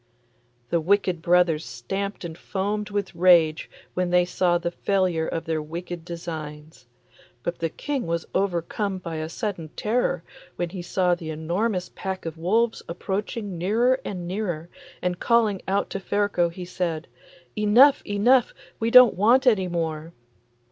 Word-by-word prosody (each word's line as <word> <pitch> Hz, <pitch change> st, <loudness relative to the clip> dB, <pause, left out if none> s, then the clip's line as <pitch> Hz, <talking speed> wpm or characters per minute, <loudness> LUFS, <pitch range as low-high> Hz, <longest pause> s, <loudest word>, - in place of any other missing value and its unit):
The 170 Hz, -, +2 dB
wicked 185 Hz, -1 st, +1 dB
brothers 170 Hz, -2 st, +3 dB
stamped 200 Hz, -1 st, -5 dB
and 165 Hz, -2 st, -6 dB
foamed 205 Hz, +4 st, -3 dB
with 200 Hz, -2 st, -3 dB
rage 170 Hz, -3 st, +4 dB, 0.2 s
when 180 Hz, -1 st, 0 dB
they 180 Hz, 0 st, +4 dB
saw 175 Hz, -1 st, +1 dB
the 170 Hz, 0 st, -3 dB
failure 180 Hz, -4 st, 0 dB
of 165 Hz, -, -3 dB
their 160 Hz, -2 st, -1 dB
wicked 170 Hz, +2 st, -6 dB
designs. 155 Hz, -5 st, -8 dB, 0.6 s
But 170 Hz, -, -3 dB
the 165 Hz, -, -1 dB
King 275 Hz, -, -3 dB
was 165 Hz, 0 st, -1 dB
overcome 195 Hz, +1 st, -1 dB
by 170 Hz, -3 st, -6 dB
a 155 Hz, 0 st, -4 dB
sudden 180 Hz, -4 st, -4 dB
terror 215 Hz, -6 st, 0 dB, 0.3 s
when 175 Hz, -1 st, -2 dB
he 185 Hz, -2 st, -5 dB
saw 180 Hz, 0 st, +1 dB
the 170 Hz, -2 st, -5 dB
enormous 180 Hz, +5 st, -2 dB
pack 190 Hz, -2 st, -5 dB
of 165 Hz, -1 st, -4 dB
wolves 220 Hz, +8 st, +1 dB
approaching 195 Hz, +2 st, -4 dB
nearer 235 Hz, +8 st, +2 dB
and 180 Hz, -3 st, -5 dB
nearer, 175 Hz, -4 st, -3 dB, 0.3 s
and 180 Hz, -1 st, -1 dB
calling 225 Hz, -5 st, +2 dB
out 195 Hz, +1 st, 0 dB
to 195 Hz, -, -3 dB
Ferko 200 Hz, -3 st, +1 dB
he 180 Hz, +1 st, -8 dB
said, 170 Hz, -3 st, -3 dB, 0.5 s
'Enough, 240 Hz, +7 st, +5 dB
enough, 235 Hz, +5 st, +3 dB, 0.2 s
we 225 Hz, -, 0 dB
don't 250 Hz, -1 st, +8 dB
want 235 Hz, +8 st, +4 dB
any 210 Hz, -7 st, +4 dB
more. 165 Hz, -1 st, -3 dB
180 Hz, 150 wpm, -25 LUFS, 170-205 Hz, 0.6 s, don't